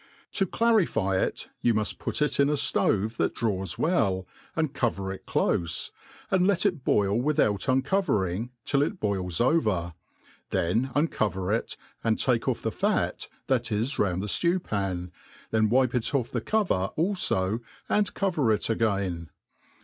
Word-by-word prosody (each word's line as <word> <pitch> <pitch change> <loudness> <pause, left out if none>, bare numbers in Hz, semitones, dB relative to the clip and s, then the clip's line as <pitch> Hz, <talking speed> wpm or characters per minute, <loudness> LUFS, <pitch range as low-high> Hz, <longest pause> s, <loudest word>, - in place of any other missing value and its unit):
To 195 - 0
c]a^ 230 +6 +2
lify 100 - +1
it, - - -3
you 120 -2 +3
muft 105 -1 -1
put - - -1
it 150 - -1
in 140 0 +4
a 150 - +1
flove 110 -4 +1
that - - 0
draws 95 -6 -1
well, 100 - +1 0.3
and 155 -4 0
cover 100 -7 -1
it 95 - -12
cloie, 85 -1 0 0.4
and 185 -1 +3
let 200 -1 +1
it 175 -9 0
boil 100 +1 +2
without 125 -8 +1
uncovering, 130 - +1 0.2
till 140 - +2
it 180 +6 -1
boils 95 -4 -1
over; 105 - +1 0.6
then 110 +10 +1
uacover 105 - 0
it, 115 - -4 0.3
and - - +2
take - - +1
off - - -1
the - - 0
fat - - -1 0.2
that 125 -4 0
is 110 +6 -1
round 95 -1 +1
the - - -2
ftew 170 - +1
pan, 95 -3 -3 0.4
then 110 -1 +2
wipe' 125 +1 +3
it 125 +3 0
off 125 -4 0
the 120 - -2
cover 175 - 0
alfo, 120 - +1 0.3
and 210 -1 +1
cover 165 - +1
it 110 +1 0
again. 95 -7 -1
115 Hz, 160 wpm, -27 LUFS, 95-150 Hz, 0.6 s, in